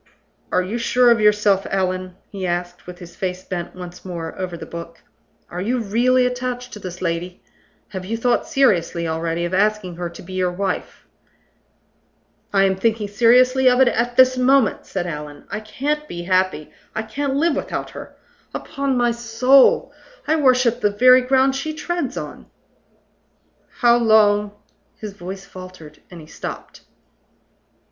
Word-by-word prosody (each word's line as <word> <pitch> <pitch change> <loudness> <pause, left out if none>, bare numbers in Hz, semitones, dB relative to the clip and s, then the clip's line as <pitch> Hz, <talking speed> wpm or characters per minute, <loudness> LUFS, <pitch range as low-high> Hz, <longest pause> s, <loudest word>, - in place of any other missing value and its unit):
"Are 185 - +2
you 215 +6 -4
sure 245 +1 +4
of 230 -2 +3
yourself, 210 -2 +3
Allan?" 185 -1 -2 0.2
he 190 -2 -4
asked, 175 0 -4
with 180 0 -9
his 175 -2 -12
face 185 -1 -4
bent 175 -2 -5
once 180 -1 -10
more 170 -3 -6
over 180 -2 -5
the - - -8
book. 170 0 -9 0.4
"Are 180 - -6
you 240 +6 0
really 245 +4 +2
attached 250 0 -3
to 210 - -8
this 185 -2 -7
lady? 175 +1 -3 0.5
Have 190 -3 -6
you 220 +5 -3
thought 245 +1 +1
seriously 175 -10 +1
already 165 +1 -2
of 175 - -4
asking 200 -3 0
her 175 -1 -4
to 170 - -12
be 185 +2 -10
your 185 -1 0
wife?" 190 +1 -4 1.5
"I 195 -1 +3
am 190 -1 +2
thinking 220 +1 0
seriously 250 +5 +4
of 250 0 +2
it 260 -2 +6
at 240 +1 -1
this 255 0 +5
moment," 260 -3 +2
said 180 -2 -3
Allan. 150 -3 -7
"I - - -3
can't 290 +8 -3
be 175 -8 -6
happy 185 -4 0 0.2
I 220 - -2
can't 270 +5 -3
live 310 +1 +2
without - - -4
her. - - -10 0.4
Upon 275 -2 -2
my 240 -1 +2
soul, 235 +3 +3 0.3
I 315 - +3
worship 255 -5 +3
the 210 - +3
very 255 +5 +6
ground 265 +1 +2
she 310 +3 -4
treads 335 -4 -3
on!" - - -7 1.3
"How 240 -1 +6
long 210 -3 +3 0.2
" - - -42
His 210 -2 -7
voice 190 +1 -8
faltered, 185 -5 -12
and 175 - -11
he - - -12
stopped. - - -8
210 Hz, 165 wpm, -21 LUFS, 180-250 Hz, 1.5 s, it